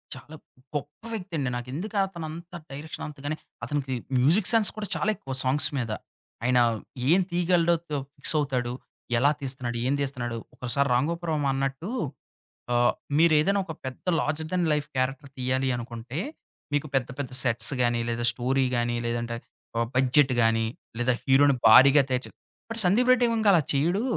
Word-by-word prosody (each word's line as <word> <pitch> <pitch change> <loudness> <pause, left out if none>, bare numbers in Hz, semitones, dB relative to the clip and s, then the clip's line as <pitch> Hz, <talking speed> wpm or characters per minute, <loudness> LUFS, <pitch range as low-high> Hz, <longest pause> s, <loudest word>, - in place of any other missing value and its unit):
చాలా 150 +3 -12 0.4
గొప్ప 145 +4 -5
వ్యక్తండి 175 - -3
నాకెందుకతను 175 - -3
అంత 170 +3 -10 0.2
డైరెక్షన్ 145 +3 -7
అంతగానే 145 +1 -5 0.3
అతనికి 140 -3 -2 0.3
మ్యూజిక్ 175 +11 +3
సెన్స్ 225 -3 +5
కూడా 210 -2 -3
చాలా 205 - 0
ఎక్కువ 135 -7 -7
సాంగ్స్ 130 +3 +4
మీద. 120 -4 -2 0.5
ఆయన 125 0 +3 0.5
ఏం 180 +4 +5
తీయగలడో 175 -1 +2 0.2
తొ 145 - 0 0.2
ఫిక్సవుతాడు, 135 -4 +1 0.4
ఎలా 140 +5 +4
తీస్తున్నాడు, 130 -3 -2
ఏం 140 - +2
తీస్తున్నాడు, 125 -4 -2 0.2
ఒకోసారి 135 +3 0
'రాంగోపాల్ 165 +6 0
వర్మ' 145 -2 0
అన్నట్టు 135 +6 -3 0.8
ఆ - - +2 0.4
మీరేదైనా 165 +4 +4
ఒక 160 - -6
పెద్ద 130 -1 -7 0.2
లార్జర్ 155 +1 -2
థాన్ 180 -1 +1
లైఫ్ 150 -1 -1
క్యారెక్టర్ 135 +2 -2
తీయాలి 130 +1 0
అనుకుంటే, 120 +2 -7 0.6
మీకు 145 +1 0
పెద్ద, 130 -2 +1
పెద్ద 135 -3 -4
సెట్స్ 125 +3 +4
గాని, 120 -1 +2
లేదా 120 0 -2
స్టోరీ 130 +2 0
గాని, 120 0 0
లేదంటే 120 0 -2 0.4
ఆ 115 - +2
బడ్జెట్ 130 +1 +4
గాని, 115 0 +2 0.3
లేదా 125 +1 +2
హీరో‌ని 140 0 +4
భారీగా 135 +5 +8
తెర్చు 125 0 -1 0.4
మరి 230 - -1
'సందీప్ 235 +8 +3
రెడ్డి 245 -1 +2
వంగ' 220 -2 +2
అలా 170 - +5
చేయ్యడు. 170 +10 +1
140 Hz, 150 wpm, -26 LUFS, 125-165 Hz, 0.8 s, భారీగా